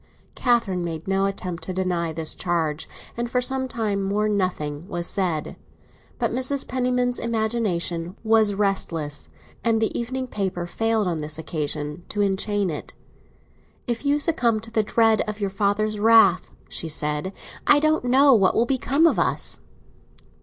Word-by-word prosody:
Catherine 230 Hz, -8 st, +1 dB
made 165 Hz, -1 st, -5 dB
no 195 Hz, 0 st, +2 dB
attempt 180 Hz, -3 st, -5 dB
to 185 Hz, -, -4 dB
deny 180 Hz, -3 st, -1 dB
this 160 Hz, 0 st, -1 dB
charge, 160 Hz, -4 st, -2 dB, 0.3 s
and 235 Hz, 0 st, -3 dB
for 250 Hz, -, +1 dB
some 260 Hz, +1 st, -1 dB
time 220 Hz, -5 st, -1 dB
more 205 Hz, +2 st, 0 dB
nothing 180 Hz, -6 st, -2 dB
was 175 Hz, -4 st, -3 dB
said. 175 Hz, -5 st, -2 dB, 0.6 s
But 235 Hz, -2 st, 0 dB
Mrs. 260 Hz, +2 st, 0 dB
Penniman's 250 Hz, -1 st, 0 dB
imagination 215 Hz, -7 st, -1 dB
was 220 Hz, -2 st, +3 dB
restless, 165 Hz, -7 st, -1 dB, 0.3 s
and 230 Hz, -1 st, +2 dB
the 220 Hz, -, 0 dB
evening 255 Hz, +2 st, -2 dB
paper 190 Hz, -7 st, -3 dB
failed 225 Hz, +4 st, 0 dB
on 170 Hz, -3 st, -1 dB
this 150 Hz, 0 st, -4 dB
occasion 150 Hz, 0 st, -3 dB
to 210 Hz, -, -1 dB
enchain 200 Hz, -1 st, 0 dB
it. 150 Hz, -, -7 dB, 0.9 s
"If 235 Hz, -1 st, -3 dB
you 285 Hz, +1 st, +2 dB
succumb 240 Hz, -8 st, +1 dB
to 225 Hz, +1 st, -9 dB
the 225 Hz, -, +2 dB
dread 225 Hz, +1 st, +3 dB
of 210 Hz, 0 st, -5 dB
your 200 Hz, -2 st, -1 dB
father's 205 Hz, +1 st, 0 dB
wrath," 220 Hz, -4 st, +5 dB, 0.2 s
she 165 Hz, -, -4 dB
said, 150 Hz, +3 st, -2 dB, 0.4 s
"I 295 Hz, -, +7 dB
don't 310 Hz, -2 st, +1 dB
know 270 Hz, +3 st, +6 dB
what 195 Hz, -5 st, +4 dB
will 230 Hz, -, +3 dB
become 270 Hz, +4 st, +2 dB
of 330 Hz, -, +3 dB
us." -, -, +1 dB
205 Hz, 155 wpm, -24 LUFS, 175-235 Hz, 0.9 s, I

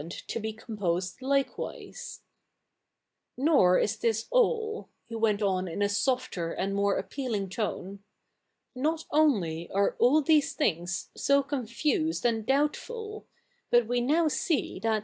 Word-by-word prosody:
id 160 Hz, -, -9 dB
to 210 Hz, -, -5 dB
be 220 Hz, 0 st, -3 dB
composed 195 Hz, -3 st, -3 dB
likewise, 275 Hz, +1 st, -3 dB, 0.6 s
' -, -, -56 dB
IVor 270 Hz, -, +5 dB
is 215 Hz, +1 st, 0 dB
this 225 Hz, -1 st, 0 dB
all,'' 450 Hz, -3 st, +1 dB, 0.2 s
he 230 Hz, -, -10 dB
went 220 Hz, -2 st, +1 dB
on 185 Hz, -2 st, +1 dB
in 180 Hz, +4 st, -2 dB
a -, -, +3 dB
softer 205 Hz, -6 st, -1 dB
and 195 Hz, +3 st, -2 dB
more 200 Hz, 0 st, +1 dB
appealing 210 Hz, -1 st, -3 dB
tone; 200 Hz, -1 st, -4 dB, 0.4 s
' -, -, -52 dB
not 310 Hz, +5 st, -1 dB
ojily 190 Hz, -, +2 dB
ai 200 Hz, +1 st, +2 dB
e -, -, -12 dB
all 290 Hz, +5 st, +5 dB
these 305 Hz, 0 st, +3 dB
things 175 Hz, -, -1 dB
so 280 Hz, 0 st, +3 dB
confused 285 Hz, -, -1 dB
and 225 Hz, -2 st, +1 dB
doubtful; 425 Hz, -, -1 dB, 0.4 s
but 240 Hz, -1 st, +4 dB
we 245 Hz, +2 st, 0 dB
tioiv 310 Hz, +5 st, +2 dB
see 320 Hz, 0 st, -1 dB
that, 225 Hz, 0 st, +1 dB
i? -, -, 0 dB
230 Hz, 150 wpm, -28 LUFS, 200-290 Hz, 0.6 s, IVor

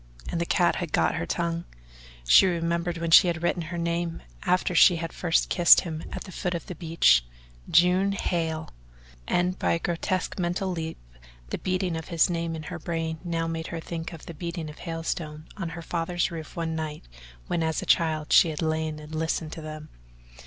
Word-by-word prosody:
And 170 Hz, -, -2 dB
the 170 Hz, -, -1 dB
cat 175 Hz, -3 st, +2 dB
had 175 Hz, -5 st, -4 dB
got 80 Hz, -1 st, +3 dB
her 85 Hz, -, -3 dB
tongue. 170 Hz, 0 st, -2 dB, 0.6 s
She 125 Hz, -, +8 dB
remembered 170 Hz, 0 st, -1 dB
when 165 Hz, 0 st, -2 dB
she 180 Hz, -, +9 dB
had 170 Hz, -1 st, -2 dB
written 175 Hz, 0 st, +1 dB
her 170 Hz, +2 st, -5 dB
name, 170 Hz, 0 st, -2 dB, 0.2 s
after 180 Hz, 0 st, +1 dB
she 175 Hz, +1 st, +7 dB
had 165 Hz, 0 st, -4 dB
first 170 Hz, -2 st, +1 dB
kissed 175 Hz, -2 st, +7 dB
him 160 Hz, -3 st, -5 dB
at -, -, -5 dB
the 190 Hz, -, -10 dB
foot 180 Hz, 0 st, -2 dB
of 170 Hz, -, -5 dB
the -, -, -6 dB
beech 160 Hz, -, +3 dB, 0.5 s
"June 180 Hz, +4 st, +4 dB
HAIL," 165 Hz, -4 st, -2 dB, 0.6 s
and 180 Hz, +1 st, +1 dB
by -, -, +2 dB
a -, -, +2 dB
grotesque 175 Hz, +3 st, -2 dB
mental 180 Hz, +2 st, -1 dB
leap 160 Hz, -2 st, -4 dB, 0.5 s
the -, -, -2 dB
beating 185 Hz, -2 st, -1 dB
of 160 Hz, -1 st, -5 dB
his 170 Hz, +1 st, +2 dB
name 165 Hz, -1 st, -2 dB
in 160 Hz, -, -6 dB
her 150 Hz, -, -6 dB
brain 165 Hz, -1 st, -3 dB
now 165 Hz, -2 st, -1 dB
made 165 Hz, 0 st, -3 dB
her 165 Hz, -, -5 dB
think 165 Hz, 0 st, -5 dB
of 165 Hz, -3 st, -10 dB
the 170 Hz, -, -7 dB
beating 170 Hz, -1 st, -5 dB
of 150 Hz, -, -15 dB
hailstones 165 Hz, -2 st, -4 dB
on 190 Hz, -5 st, -4 dB
her 170 Hz, +1 st, -7 dB
father's 170 Hz, +1 st, -1 dB
roof 160 Hz, -2 st, -7 dB
one 165 Hz, -1 st, -2 dB
night 155 Hz, -1 st, -4 dB, 0.4 s
when 170 Hz, -, -1 dB
as 160 Hz, -1 st, -1 dB
a -, -, -6 dB
child 155 Hz, -3 st, +2 dB
she 165 Hz, -, +7 dB
had 155 Hz, +1 st, -3 dB
lain 160 Hz, -1 st, -1 dB
and 150 Hz, +1 st, -10 dB
listened 160 Hz, 0 st, -2 dB
to 160 Hz, -, -7 dB
them. 155 Hz, 0 st, -8 dB
165 Hz, 200 wpm, -26 LUFS, 160-175 Hz, 0.6 s, she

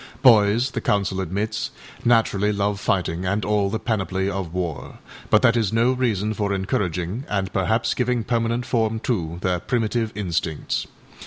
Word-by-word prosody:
â -, -, -26 dB
Boys, 115 Hz, +1 st, +5 dB
the 115 Hz, -, -3 dB
Council 100 Hz, -2 st, 0 dB
admits, 110 Hz, -, -2 dB, 0.3 s
naturally 110 Hz, -4 st, +3 dB
love 100 Hz, -1 st, -1 dB
fighting 90 Hz, -3 st, 0 dB
and 100 Hz, +3 st, -1 dB
all 105 Hz, -1 st, +1 dB
the 110 Hz, -, -1 dB
panoply 95 Hz, -4 st, -1 dB
of 95 Hz, -4 st, -3 dB
war... 85 Hz, -3 st, -4 dB, 0.3 s
but 105 Hz, -, +4 dB
that 120 Hz, -1 st, +5 dB
is 110 Hz, -4 st, +1 dB
no 115 Hz, +3 st, +3 dB
reason 110 Hz, -5 st, 0 dB
for 100 Hz, -1 st, -1 dB
encouraging, 95 Hz, +2 st, -2 dB
and 95 Hz, -2 st, -1 dB
perhaps 110 Hz, +4 st, +1 dB
giving 125 Hz, -2 st, 0 dB
permanent 115 Hz, +1 st, 0 dB
form 115 Hz, -2 st, 0 dB
to, 85 Hz, -9 st, -2 dB
their 90 Hz, -1 st, +1 dB
primitive 115 Hz, -1 st, -1 dB
instincts. 85 Hz, -5 st, -2 dB
105 Hz, 160 wpm, -23 LUFS, 95-115 Hz, 0.3 s, Boys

